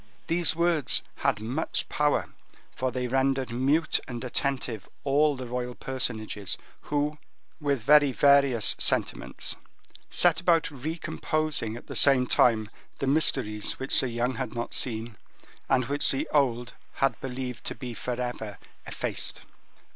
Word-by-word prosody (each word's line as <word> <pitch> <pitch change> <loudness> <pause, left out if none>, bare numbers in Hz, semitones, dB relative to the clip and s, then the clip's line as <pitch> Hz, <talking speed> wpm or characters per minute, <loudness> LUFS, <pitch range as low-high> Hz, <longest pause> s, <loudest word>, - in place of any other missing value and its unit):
These 170 -1 +1
words 170 -4 +3
had - - 0
much 125 +9 -2
power, 150 0 0 0.4
for 130 0 -1
they 125 0 -2
rendered 135 0 0
mute 140 +7 +2
and 120 -1 -6
attentive 125 -4 -2
all 145 +1 +3
the 130 -1 -6
royal 125 0 -4
personages, 110 -6 -3 0.3
who, 150 +1 -1 0.4
with 140 -6 -1
very 145 +1 +6
various 140 -3 +4
sentiments, - - +1 0.5
set - - +4
about 170 -2 +2
recomposing 155 -3 -2
at - - -12
the - - -8
same 135 -3 +5
time 110 -3 +2 0.3
the 140 - -2
mysteries 135 -7 +2
which 135 - 0
the 130 - 0
young 120 +1 -1
had - - -4
not 120 0 -4
seen, 115 -2 -1 0.5
and 130 -2 +3
which 145 +3 +1
the 135 - -1
old 125 -4 +1 0.2
had 135 - 0
believed 125 -1 -5
to - - -3
be 125 -3 -6
forever 120 -3 -4 0.3
effaced. - - -3
130 Hz, 135 wpm, -27 LUFS, 120-145 Hz, 0.5 s, very